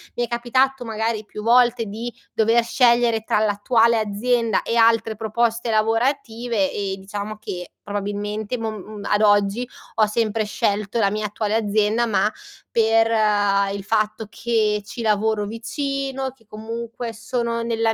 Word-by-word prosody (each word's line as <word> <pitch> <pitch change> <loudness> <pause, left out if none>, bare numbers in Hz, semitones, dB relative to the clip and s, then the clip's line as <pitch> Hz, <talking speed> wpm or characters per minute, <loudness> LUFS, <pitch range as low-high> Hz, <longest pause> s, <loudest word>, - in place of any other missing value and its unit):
Mi 240 - 0
è - - -12
capitato, 245 +2 +1
magari 225 -1 -2
più 210 0 -9
volte 240 0 +4
di 225 +4 -5 0.2
dover 225 +2 +3
scegliere 235 -2 +3
tra 215 - +1
l'attuale 225 +2 +3
azienda 225 +1 +1
e 230 - -2
altre 225 -1 +3
proposte 230 +2 -1
lavorative 225 -1 0
e 195 -2 -3
diciamo 205 +2 -6
che 180 -4 -7 0.2
probabilmente 205 +3 -3
mom 220 -1 -3
uhm, 210 -1 -9
ad 205 - +2
oggi 205 +3 +3 0.3
ho 215 - +4
sempre 215 0 0
scelto 205 +1 -1
la 200 -3 +3
mia 210 +1 -2
attuale 210 +1 -2
azienda, 215 +1 +1
ma 215 -1 +1 0.4
per, 225 0 +3
ehm, 205 -2 +2
il 200 -1 -5
fatto 215 +1 -1
che 215 -2 0
ci 235 - -7
lavoro 215 -1 +1
vicino, 270 +4 -3
che 245 -3 -27
comunque 230 +2 -6
sono 235 0 -2
nella 225 -1 +1
225 Hz, 145 wpm, -22 LUFS, 210-235 Hz, 0.4 s, volte